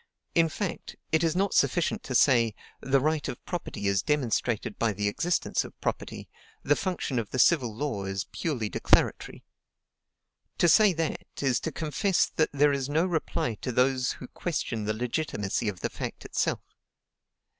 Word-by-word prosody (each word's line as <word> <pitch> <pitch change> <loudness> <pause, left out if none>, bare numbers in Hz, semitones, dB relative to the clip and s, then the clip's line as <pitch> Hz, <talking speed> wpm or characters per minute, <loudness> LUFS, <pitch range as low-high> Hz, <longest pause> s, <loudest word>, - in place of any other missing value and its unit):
In 165 -1 +4
fact, 185 +2 -4 0.2
it 160 +1 +3
is 165 0 +1
not 195 +2 +1
sufficient 175 - +2
to 130 - -3
say, 120 -4 +4 0.3
"The 135 0 +2
right 155 +1 0
of 125 - -7
property 175 - -5
is 100 -1 +2
demonstrated 125 -5 -1
by 115 -2 +1
the 105 +1 -1
existence 170 +12 0
of - - -12
property; - - -4 0.4
the 145 - +3
function 175 -9 -2
of 110 - -4
the - - -4
civil 130 -4 +4
law 110 -4 -3
is 95 0 -3
purely 135 -10 -2
declaratory." - - +1 1.1
To 175 - +4
say 210 +5 +6
that, 165 -1 -3 0.2
is 130 -3 +2
to 160 - -4
confess 170 +5 +1
that 160 - 0
there 145 0 +3
is 135 -1 -2
no 160 +4 +2
reply 160 -8 -1
to 125 - -2
those 130 +1 +2
who 125 - -10
question 120 -10 -3
the 110 - 0
legitimacy 115 -4 -1
of 95 - -7
the - - -1
fact - - -6
itself. - - -1
135 Hz, 165 wpm, -28 LUFS, 115-160 Hz, 1.1 s, say